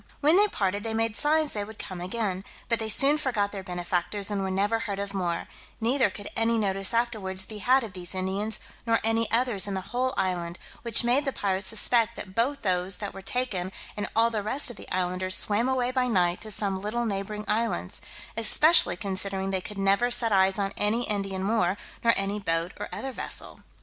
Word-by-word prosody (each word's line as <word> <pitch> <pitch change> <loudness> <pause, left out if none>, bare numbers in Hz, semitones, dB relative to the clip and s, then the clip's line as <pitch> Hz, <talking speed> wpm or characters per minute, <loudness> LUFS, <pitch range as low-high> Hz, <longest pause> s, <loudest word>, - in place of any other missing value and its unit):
When 305 +3 +4
they 410 +2 +6
parted, 200 - -1
they 225 -1 -2
made 225 -1 0
signs 305 +2 +2
they 205 - -2
would 220 +1 -10
come 185 -2 -7
again, 190 0 -2 0.3
but 230 - +1
they 220 -1 -3
soon 280 +7 +3
forgot 220 -8 0
their 195 - -5
benefactors, 180 +2 -2
and 200 -1 -1
were 190 - -2
never 205 +4 +1
heard 205 -3 -3
of 200 0 -4
more; 175 -3 -2 0.3
neither 240 0 +2
could 205 +2 -8
any 230 0 +2
notice 195 -2 0
afterwards 210 -5 0
be 215 0 -8
had 260 +4 +3
of 215 -5 -7
these 180 0 -2
Indians, 195 +4 -2 0.3
nor 225 0 +3
any 225 0 +2
others 230 -4 +3
in 200 - -2
the 190 0 -5
whole 255 +1 0
island, 175 -2 -1 0.2
which 235 -1 +4
made 245 +4 +3
the 275 - -1
pirates 195 -4 -2
suspect 230 +1 +2
that 185 - -8
both 250 +7 0
those 185 -1 +1
that 205 -2 -5
were 195 - -9
taken, 195 -4 -2 0.2
and 205 - -2
all 230 +1 +4
the 215 -2 -1
rest 250 +6 0
of - - -11
the - - -11
islanders, 185 0 +1
swam 220 +5 +2
away 255 -1 +1
by 255 -1 +1
night 180 -6 +1
to 220 - -5
some 195 -2 -1
little 230 +4 -2
neighbouring 210 0 -3
islands, 210 - -1 0.3
especially 305 +9 +5
considering 195 -1 -3
they 190 -1 -1
could 210 +3 -6
never 195 +5 +3
set 235 -2 +2
eyes 190 0 +4
on 200 -1 -1
any 225 +4 +2
Indian 195 -2 -2
more, 200 -3 +1 0.3
nor 230 -1 +5
any 195 +1 0
boat 165 -2 -1
or - - -5
other 270 - -4
vessel. - - -5
205 Hz, 210 wpm, -27 LUFS, 190-230 Hz, 0.3 s, they